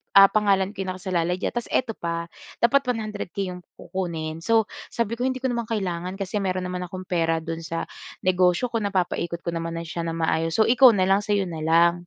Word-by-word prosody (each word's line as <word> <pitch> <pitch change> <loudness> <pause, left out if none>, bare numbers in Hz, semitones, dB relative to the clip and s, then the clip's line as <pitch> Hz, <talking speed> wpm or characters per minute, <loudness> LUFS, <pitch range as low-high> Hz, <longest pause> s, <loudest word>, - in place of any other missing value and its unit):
ah, 195 0 +9
pangalan 200 -2 +2
ko 195 -2 -5
nakasalalay 180 -2 -1
diyan.” 185 - -2
Tapos 240 -1 -3
eto 250 -3 0
pa, 170 0 -2 0.4
dapat 265 +4 +5
100K 210 -5 -3
'yong 180 - -7 0.2
kukunin. 165 -4 -4
So 225 +4 +3 0.3
sabi 230 -1 -1
ko, - - -3
“Hindi 260 0 -1
ko 260 - +1
naman 235 -2 -2
kailangan 185 -4 -2
kasi 195 +1 -2
meron 185 -1 -1
naman 180 0 -3
akong 185 +2 -7
pera 165 -2 +1
do'n 165 0 -4
sa 165 0 -3 0.4
negosyo 185 +5 +3
ko 230 - +2
napapaikot 180 -4 -1
ko 170 - -1
naman 165 0 -3
na 165 - -4
siya 170 +1 -4
nang 165 0 -3
maayos. 160 0 +1
So 220 - +6
ikaw 250 +2 +7
na 190 - +2
lang 195 +1 +4
sa 205 0 0
'yo 200 - +2
na 165 -3 -6
lang.” 170 +2 +3
185 Hz, 215 wpm, -24 LUFS, 170-210 Hz, 0.4 s, ah